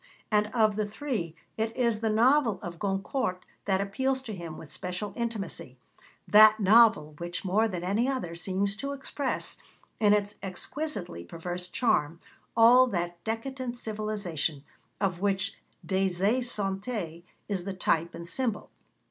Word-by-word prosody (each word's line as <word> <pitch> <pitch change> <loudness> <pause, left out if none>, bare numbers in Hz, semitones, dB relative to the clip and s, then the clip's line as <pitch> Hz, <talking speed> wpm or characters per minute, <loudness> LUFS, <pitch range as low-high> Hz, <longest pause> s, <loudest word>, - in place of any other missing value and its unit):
And 210 0 +3
of 215 -2 +2
the 215 -1 0
three 210 - -3 0.2
it 225 +1 -2
is 235 -4 +2
the 225 0 0
novel 230 -1 +4
of 170 -3 -6
Goncourt 195 0 -1 0.2
that 195 -1 +2
appeals 260 +7 -1
to 220 - -6
him 170 -4 -7
with 150 - -11
special 180 +5 -4
intimacy 210 - -4 0.5
that 215 +1 +8
novel 205 -7 +5
which, 175 +2 -4
more 210 +5 +3
than 180 -5 -4
any 210 +8 +1
other, 255 -11 -2
seems 195 +3 -1
to 280 +4 -3
express, 275 0 -2 0.4
in 210 -2 +5
its 205 0 0
exquisitely 195 - -5
perverse 175 - -5
charm, 170 -7 +1 0.4
all 245 +3 +8
that 175 -5 -3
decadent 245 +2 -3
civilisation 210 - -2 0.4
of 190 -3 0
which 200 +1 +1 0.3
Des 190 0 +2
Esseintes 195 -3 -1 0.3
is 195 -4 -2
the 195 +1 -4
type 170 -2 +1
and 170 - -8
symbol. 235 +2 -2
205 Hz, 140 wpm, -28 LUFS, 180-230 Hz, 0.5 s, that